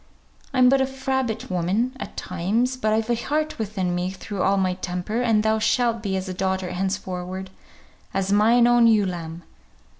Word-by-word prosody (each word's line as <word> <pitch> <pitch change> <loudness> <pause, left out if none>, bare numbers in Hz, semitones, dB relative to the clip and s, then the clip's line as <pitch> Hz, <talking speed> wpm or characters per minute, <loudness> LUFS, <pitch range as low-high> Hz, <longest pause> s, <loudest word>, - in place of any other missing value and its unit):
I'm 255 -2 +5
but 270 +1 +4
a 265 - +2
frabbit 265 -5 -2
woman 195 +9 0
at - - -8
times, 210 +9 -1
but 215 -4 -1
I've 220 +2 +1
a - - +4
heart 300 +6 -2
within 195 -4 -2
me 180 +1 -1
through 190 +1 -6
all 195 +1 +3
my 185 -1 +1
temper, 180 +5 -3
and 225 -3 +2
thou 220 0 +2
shalt 230 +1 +1
be 195 -3 -1
as 190 0 -4
a 185 - -4
daughter 190 -1 -2
henceforward, 185 0 -4 0.6
as 195 0 -1
mine 230 +4 +5
own 240 -1 +5
ewe 215 -3 +4
lamb. 170 -2 -5
210 Hz, 180 wpm, -23 LUFS, 185-240 Hz, 0.6 s, I'm